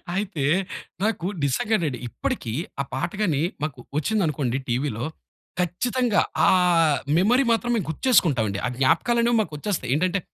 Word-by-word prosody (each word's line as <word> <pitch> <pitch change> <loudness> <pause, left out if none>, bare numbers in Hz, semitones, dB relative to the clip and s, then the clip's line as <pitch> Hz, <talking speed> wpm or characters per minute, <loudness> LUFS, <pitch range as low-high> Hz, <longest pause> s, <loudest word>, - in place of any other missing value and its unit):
అయితే 195 -8 -2 0.6
నాకు 210 -5 0 0.2
నిజంగండి. 150 - 0
ఇప్పటికి 110 0 -3 0.3
ఆ - - -1
పాట 135 +6 -2
గాని 155 -8 +1 0.2
మాకు 140 -5 -3 0.2
ఒచ్చిందనుకోండి 150 - 0
టీవీలో. 120 -1 -1 0.5
ఖచ్చితంగా 230 +6 +1 0.3
ఆ - - +5 0.7
మెమరీ 245 +9 +4
మాత్రం 230 +2 +1
మేము 200 -9 -1
గుర్తు 160 - -6
చేసుకుంటామండి. 120 - +3
ఆ - - +1
జ్ఞాపకాలనేవి 235 - +2
మాకొచ్చేస్తాయి. 155 - -3
ఏంటంటే 185 +4 +1
170 Hz, 120 wpm, -24 LUFS, 135-215 Hz, 0.7 s, ఆ